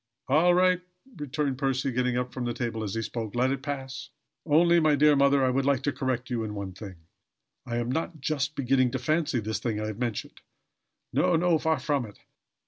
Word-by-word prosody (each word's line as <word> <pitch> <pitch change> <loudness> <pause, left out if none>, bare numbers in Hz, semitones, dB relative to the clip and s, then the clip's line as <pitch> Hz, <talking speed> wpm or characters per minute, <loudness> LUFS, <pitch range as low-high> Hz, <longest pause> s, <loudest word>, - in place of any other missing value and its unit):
"All 165 +6 +4
right," 180 0 +3 0.4
returned 145 -2 -2
Percy, 135 -1 0
getting 125 0 0
up 125 0 -3
from 130 - -4
the 120 -1 -2
table 115 -2 -3
as 100 -1 -4
he 115 - -1
spoke. 110 0 -5
"Let 125 +2 +2
it 135 -1 -2
pass. 135 -2 -5 0.4
Only, 170 +3 +5
my 155 -2 +4
dear 150 +1 +5
mother, 140 -1 +4
I 130 - +2
would 135 +2 +1
like 140 -1 +1
to 145 - +1
correct 130 -1 -3
you 115 -2 -1
in 105 -1 -5
one 100 -2 -5
thing. 95 0 -9 0.7
I 120 - -3
am 120 +1 -1
not 160 +3 -3
just 145 +1 -2
beginning 130 -1 +2
to - - 0
fancy 150 0 0
the 110 +1 -4
thing 110 -2 -2
I 110 - -2
have 110 0 -5
mentioned. 120 -4 -4 0.7
No, 175 - +3
no: 170 -1 +3
far 160 +1 +1
from 140 -6 -1
it. 105 - -14
130 Hz, 215 wpm, -27 LUFS, 120-150 Hz, 0.7 s, Only